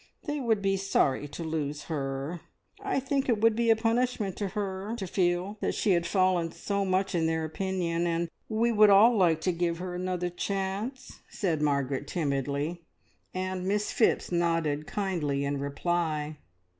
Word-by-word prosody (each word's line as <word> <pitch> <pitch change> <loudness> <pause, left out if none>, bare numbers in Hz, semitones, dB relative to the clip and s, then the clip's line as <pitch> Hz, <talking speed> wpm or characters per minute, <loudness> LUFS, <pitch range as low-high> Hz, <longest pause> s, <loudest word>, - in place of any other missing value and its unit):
They 295 -2 -2
would 225 -6 +1
be 195 0 +2
sorry 145 -7 +1
to 155 +4 -7
lose 150 -2 -3
her. 140 +2 -3 0.4
I 395 -8 0
think 270 0 -1
it 225 -3 +3
would 225 0 +4
be 235 0 +1
a 225 - +7
punishment 225 -3 0
to 205 - -1
her 195 +2 -3
to 200 - -4
feel 180 +3 0
that - - 0
she 205 - +1
had 170 -1 +2
fallen 185 -3 +2
so 200 +3 -2
much 190 +1 0
in 165 -2 +2
their 160 0 0
opinion, 175 0 -1
and 170 0 0 0.2
we 230 +2 +2
would 215 -1 +6
all 215 +5 +7
like 170 -6 +3
to 185 - +1
give 170 -1 -1
her 180 +1 -5
another 180 0 -2
chance," 195 +8 -3
said 165 -7 -1
Margaret 140 -1 0
timidly, 145 +2 -1 0.5
and 185 0 -3
Miss 210 +1 0
Phipps 225 - +2
nodded 165 -4 0
kindly 160 -9 -1
in 140 0 -1
reply. 155 +1 -1
180 Hz, 170 wpm, -28 LUFS, 160-205 Hz, 0.5 s, a